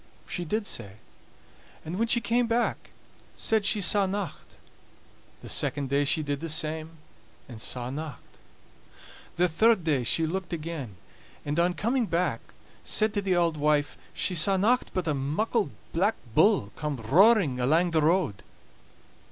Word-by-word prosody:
She 175 - -3
did 210 +6 -1
sae; 100 - -4 0.9
and 170 +5 -4
when 230 - +2
she 235 +1 +3
came 235 +1 +1
back 235 +1 -1 0.5
said 220 -2 +1
she 210 - +1
saw 200 +1 +3
nocht. 195 -1 -5 0.9
The - - -10
second 140 -2 0
day 140 +1 +2
she 155 +2 +1
did 145 -1 -2
the 165 +2 -5
same, 155 +1 -2 0.5
and 120 -4 -9
saw 125 +1 -3
nocht. 150 -1 -8 1.0
The 180 +1 +3
third 215 +4 +3
day 145 -6 +1
she 160 +7 +2
looked 180 +2 -4
again, 155 - -5 0.5
and 150 +3 -1
on 175 +1 +2
coming 235 +6 0
back 170 +1 0 0.4
said 215 -1 +1
to 205 - 0
the 190 -2 0
auld 170 -2 +1
wife 150 0 +1 0.2
she 185 - -1
saw 190 +3 +2
nocht 235 +7 +2
but 185 -3 -1
a 155 - +1
muckle 160 - -1 0.2
Black 195 +6 +2 0.2
Bull 195 - +3
coming 145 -7 -4
roaring 185 - +5
alang 160 +8 +2
the 160 -1 +2
road. 155 - +1
170 Hz, 155 wpm, -27 LUFS, 150-200 Hz, 1.0 s, roaring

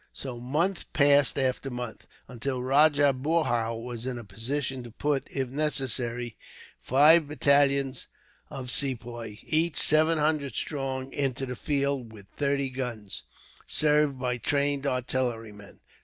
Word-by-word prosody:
So 125 -3 -6
month 160 +10 -1
passed 145 -2 +4
after 135 0 0
month, 125 -2 -7 0.2
until 125 +1 -4
Rajah 145 +1 +4
Boorhau 130 -5 0
was 120 0 -5
in 125 -2 -3
a 120 - -7
position 125 +6 -3
to 120 - -10
put, 140 +4 -2
if 135 -2 -2
necessary, 125 -5 -2 0.4
five 150 +4 +5
battalions 140 -2 +2 0.4
of 125 -2 -6
Sepoys, 120 -5 -2
each 160 0 +1
seven 155 +2 +4
hundred 150 -5 0
strong, 135 -2 -3
into 135 -2 -1
the 125 -1 -5
field; 140 -3 -1
with 105 -3 -12
thirty 140 -1 0
guns, 115 - -5 0.4
served 150 -2 +2
by 125 -1 -2
trained 140 +3 0
artillerymen. 120 -5 -3
135 Hz, 125 wpm, -27 LUFS, 120-145 Hz, 0.4 s, five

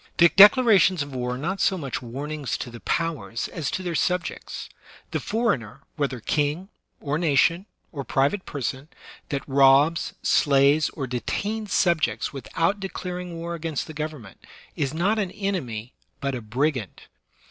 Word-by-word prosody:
Declarations 195 - +7
of 140 -1 -10
war 125 -1 -2
are - - -6
not 180 +8 -3
so 190 - +2
much 140 -7 -4
warnings 140 +2 -4
to 125 - -6
the 120 - -9
powers 165 -8 -2
as 165 -5 -3
to 185 - -3
their 175 -2 -2
subjects. 180 +2 -2 0.4
The - - -1
for 230 -2 +1
eigner, 110 -5 -11
whether 135 -4 -2
king, 150 - -1 0.3
or 145 +2 -2
nation, 170 +4 +2 0.2
or 140 -4 -5
private 140 +10 +1
person, 135 +1 -4 0.4
that 140 -4 -3
robs, 140 +4 +4
slays, 140 +2 +4
or 140 - -5
detains 200 - -3
subjects 170 -5 +1
without 165 +8 -1
declaring 180 -2 -5
war 170 +1 -4
against 165 -3 -3
the 155 - -9
government, 150 -10 -7 0.3
is 140 -3 -1
not 195 +8 +1
an 195 -3 -1
enemy, 160 - -4 0.3
but 140 -1 -2
a 125 - -4
brigand. 125 - -2
155 Hz, 150 wpm, -25 LUFS, 135-180 Hz, 0.4 s, Declarations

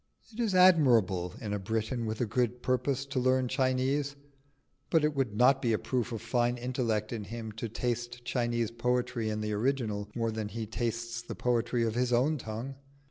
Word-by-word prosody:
It 220 - -11
is 220 -5 +1
admirable 120 - +5
in 105 -6 -4
a 105 - -1
Briton 110 +4 -2
with 110 +1 -3
a - - +3
good 120 +2 -1
purpose 130 +1 0
to 140 -1 -2
learn 130 0 +2
Chinese, 130 +2 0 0.7
but 160 -2 +3
it 150 -1 +1
would 130 -7 -1
not 130 +3 +5
be 115 -3 +2
a - - +3
proof 125 0 -2
of 115 -1 -5
fine 120 +1 +1
intellect 120 -3 -1
in 110 -3 -4
him 115 0 -6
to 110 +2 -5
taste 120 +1 -3
Chinese 120 -3 0
poetry 120 -1 0
in 105 0 -2
the 105 0 -2
original 105 -3 -1
more 115 -1 0
than 110 -1 -3
he 110 +1 -4
tastes 115 +1 -3
the 120 - -7
poetry 120 0 +1
of 115 -1 0
his 125 +1 0
own 135 +5 +2
tongue. 120 +5 -6
120 Hz, 190 wpm, -30 LUFS, 110-130 Hz, 0.7 s, admirable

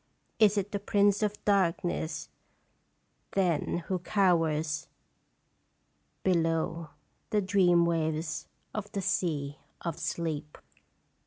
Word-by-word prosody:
Is 210 -1 +5
it 200 +1 -1
the 200 - -1
Prince 205 0 +3
of 210 -1 -2
Darkness, 175 -4 0 1.0
then, 175 -2 +1
who 185 -1 -1
cowers 165 -5 +1 1.4
Below 165 -2 +1 0.4
the 210 - +2
dream 185 -3 +4
waves 160 -1 -1 0.3
of 210 -1 -4
the 200 - -1
sea 145 -6 -1 0.2
of 170 -3 -4
Sleep 155 -3 -3
175 Hz, 95 wpm, -30 LUFS, 160-200 Hz, 1.4 s, Is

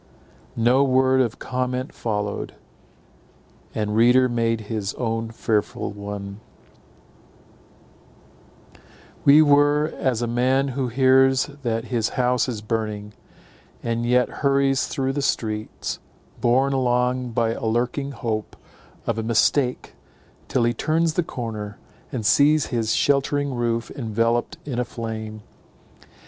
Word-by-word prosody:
No 120 +4 +4
word 130 0 +3
of 120 -3 -1
comment 125 0 -3
followed; 105 -2 -3 1.2
each 105 -1 -1
reader 120 +4 +4
made 115 -2 0
his 105 -2 -4
own 115 -2 -2
fearful 110 -3 -1
one. 100 -1 -7 2.9
We 145 +2 +8
were 145 +1 +3
as 125 -4 0
a - - +1
man 130 +4 +1
who 130 0 -2
hears 130 +2 +3
that 115 -3 -1
his 115 -2 +1
house 125 0 +2
is 110 -4 -5
burning, 105 -2 -3 0.7
and 115 0 -1
yet 125 +1 +2
hurries 140 -1 +2
through 135 -2 -2
the 145 - -1
streets, 110 -5 -2 0.4
borne 130 +3 +2
along 125 -1 0
by 115 0 +1
a - - -6
lurking 120 +5 -1
hope 115 -4 -4 0.5
of 115 - -1
a - - -2
mistake, 125 +3 +1 0.5
till 125 - +1
he 120 0 +2
turns 160 +5 +1
the 175 - +1
corner, 110 - -6 0.3
and 115 -5 -4
sees 145 +6 +4
his 115 -1 +1
sheltering 140 +1 +1
roof 115 -1 -1
enveloped 115 -2 -1
in 130 -4 -3
a - - +2
flame. 110 -2 -6
120 Hz, 120 wpm, -23 LUFS, 115-135 Hz, 2.9 s, We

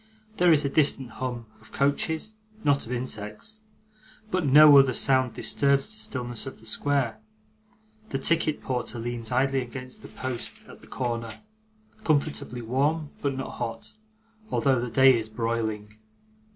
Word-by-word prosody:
There 175 -1 +5
is 150 -2 +4
a - - +3
distant 135 -4 +2
hum 120 -1 -5
of 110 - -20
coaches, 160 +8 0 0.3
not 140 -4 +2
of - - -7
insects 120 - -4 0.7
but 185 -1 +1
no 150 +2 +9
other 135 -2 +4
sound 130 -1 +2
disturbs 140 +6 +1
the 215 - -7
stillness 120 - -2
of 135 - -8
the 110 - -17
square. 135 +1 0 0.9
The 135 - -1
ticket 155 +2 0
porter 125 -2 -3
leans 115 0 -4
idly 135 +1 +2
against 130 +1 -6
the - - -10
post 130 -2 -6
at - - -14
the - - -16
corner: 115 -3 -4 0.6
comfortably 145 -5 0
warm, 145 +6 0
but 140 -2 -1
not 135 - -6
hot, 115 0 -5 0.6
although 135 - +2
the 125 - -3
day 130 +2 +6
is 110 -1 -3
broiling. 110 -2 -3
130 Hz, 150 wpm, -26 LUFS, 115-140 Hz, 0.9 s, no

